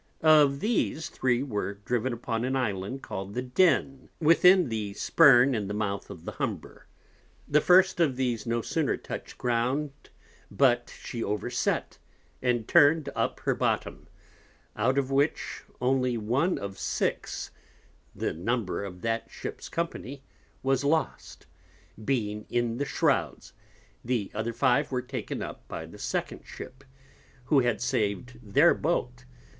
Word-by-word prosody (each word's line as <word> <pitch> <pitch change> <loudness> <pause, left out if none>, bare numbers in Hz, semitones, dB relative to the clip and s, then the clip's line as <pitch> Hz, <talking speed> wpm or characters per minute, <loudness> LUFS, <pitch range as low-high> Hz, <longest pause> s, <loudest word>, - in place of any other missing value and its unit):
Of 150 -3 +5
these, 210 -8 0
three 125 0 0
were 105 -6 -3
driven 120 +5 -2
upon 115 -1 -3
an 130 +1 -1
Island 110 0 -2
call'd 95 +1 -6
the 125 - -1
Den, 135 -1 +1
within 170 +1 +5
the 105 -3 -3
Spurn 135 -1 +6
in 105 -4 -2
the 105 - -4
Mouth 100 -2 -3
of - - -10
the - - -4
Humber. - - -5 0.6
The 150 +1 +3
first 185 +2 +5
of 150 -6 +3
these 125 -3 -2
no 115 0 0
sooner 160 -4 0
touch'd - - -8
Ground, 125 +5 0 0.6
but 120 -3 +2
she 115 -2 -4
over 105 +4 -2
set, 125 - -1 0.4
and 120 -3 0
turn'd 145 0 +5
up - - -1
her - - +1
Bottom; - - -2 0.7
out 130 +5 +1
of 135 -1 0
which, 140 +3 0 0.2
only 125 -1 +1
one 125 - +1
of 100 -1 -6
six - - -2 0.6
(the - - -2
Number 100 +3 -2
of 90 -2 -8
that 115 0 -2
Ship's - - -7
Company) 140 -5 -4 0.4
was 135 0 +1
lost, 155 +3 -1 0.6
being 105 -5 -2
in 120 -1 0
the 145 - -1
Shrowds: - - 0 0.5
the 115 -5 -1
other 110 +2 -2
five 130 +4 +2
were 125 -1 -1
taken 130 +1 -5
up - - -9
by - - -6
the - - -13
second - - -3
Ship, 130 +1 -10 0.6
who 145 0 +4
had 120 -2 +1
sav'd 105 +4 -2
their 100 -4 +4
Boat. - - -2
125 Hz, 145 wpm, -28 LUFS, 110-140 Hz, 0.7 s, Spurn